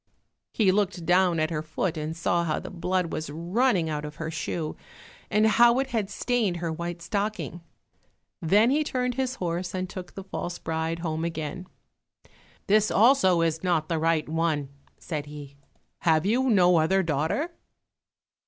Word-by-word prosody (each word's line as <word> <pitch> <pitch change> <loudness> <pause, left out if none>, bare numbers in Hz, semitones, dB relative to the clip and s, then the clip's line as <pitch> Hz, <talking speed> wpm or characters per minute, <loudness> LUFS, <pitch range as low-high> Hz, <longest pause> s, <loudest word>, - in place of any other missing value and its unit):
He 205 -4 +3
looked 195 -3 0
down 180 -1 +3
at 155 +1 0
her 155 -2 -1
foot 155 +2 -2
and 155 +1 -4
saw 170 +1 +1
how 155 -2 -1
the - - -8
blood 180 -1 -1
was 155 - -3
running 175 - +1
out 150 -1 -3
of 150 0 -7
her 155 +1 -5
shoe, 160 0 -3 0.5
and 215 +1 +3
how 235 +2 +5
it 265 0 -1
had 215 -5 -1
stained 215 -4 0
her 170 -1 -3
white 170 +1 -5
stocking. 205 -3 -3 0.8
Then 205 +9 +4
he 300 +2 +2
turned 250 -3 -1
his 260 0 -2
horse 175 -1 -3
and 185 0 -2
took 180 -1 -9
the 195 - -6
false 175 -2 -5
bride 160 +1 -2
home 160 0 -2
again. 170 +2 -4 1.0
"This 215 +1 +3
also 205 -7 +4
is 165 0 0
not 170 -4 +1
the 165 -2 0
right 160 -1 +1
one," 155 -3 0 0.3
said 150 -3 -5
he, 145 -2 -10 0.4
"have 160 0 +2
you 250 +6 +2
no 180 -5 +5
other 190 +5 +3
daughter?" 165 - -1
175 Hz, 165 wpm, -26 LUFS, 160-205 Hz, 1.0 s, how